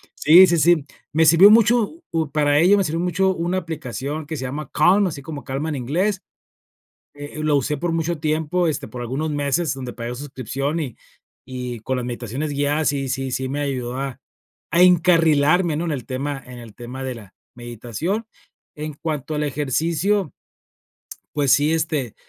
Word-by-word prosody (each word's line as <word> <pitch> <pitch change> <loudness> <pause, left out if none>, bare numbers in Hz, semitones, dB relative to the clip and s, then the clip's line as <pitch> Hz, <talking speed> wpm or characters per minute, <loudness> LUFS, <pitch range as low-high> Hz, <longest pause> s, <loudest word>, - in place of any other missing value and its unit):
Sí, 175 +5 +7
sí, 170 0 +2
sí. 165 -3 +4 0.3
Me 160 +1 +4
sirvió 170 +6 +8
mucho, 235 - +3
pu 160 -3 -1
para 145 -1 +2
ello 190 +5 +5
me 195 - +2
sirvió 160 +2 -2
mucho 185 +2 +1
una 175 +3 -1
aplicación 150 -2 -5
que 160 -2 -4
se 130 - -5
llama 140 +2 -5
Calm, 185 +6 +4
así 145 -4 -6
como 145 -3 -7
calma 140 +4 -3
en 150 - -2
inglés, 185 - -1 0.9
eh, 145 +1 -8
lo 150 -1 +2
usé 145 +2 -1
por 175 +2 -2
mucho 165 -1 -1
tiempo, 160 +3 0
este, 150 -2 -2
por 125 - -7
algunos 140 +6 -3
meses, 145 +2 0
donde 130 -2 -7
pagué 120 0 -5
suscripción 135 +3 -4
y 130 -6 -5 0.6
y 125 -2 -5
con 130 +2 -2
las 125 - -3
meditaciones 125 +5 -4
guiadas 145 +2 +1
sí 135 -2 -2
sí 135 0 -2
sí 130 +1 -2
me 145 +2 -2
ayudó 130 -3 -3
a 135 -2 -4 0.5
a 175 +2 +5
encarrilarme, 165 -2 +4
¿no? 170 - -2
En 165 - -2
el 130 -4 -5
tema 135 +1 -4
en 125 -1 -10
el 115 -3 -12
tema 125 +2 -7
de 130 -2 -4
la 105 -4 -13 0.2
meditación. 120 - -4 0.5
En 150 0 -5
cuanto 155 -1 -4
al 150 - -1
ejercicio, 160 +6 0 1.0
pues 145 -3 +1
sí, 145 +3 +4
este, 155 -7 -1
150 Hz, 180 wpm, -21 LUFS, 130-165 Hz, 1.0 s, sirvió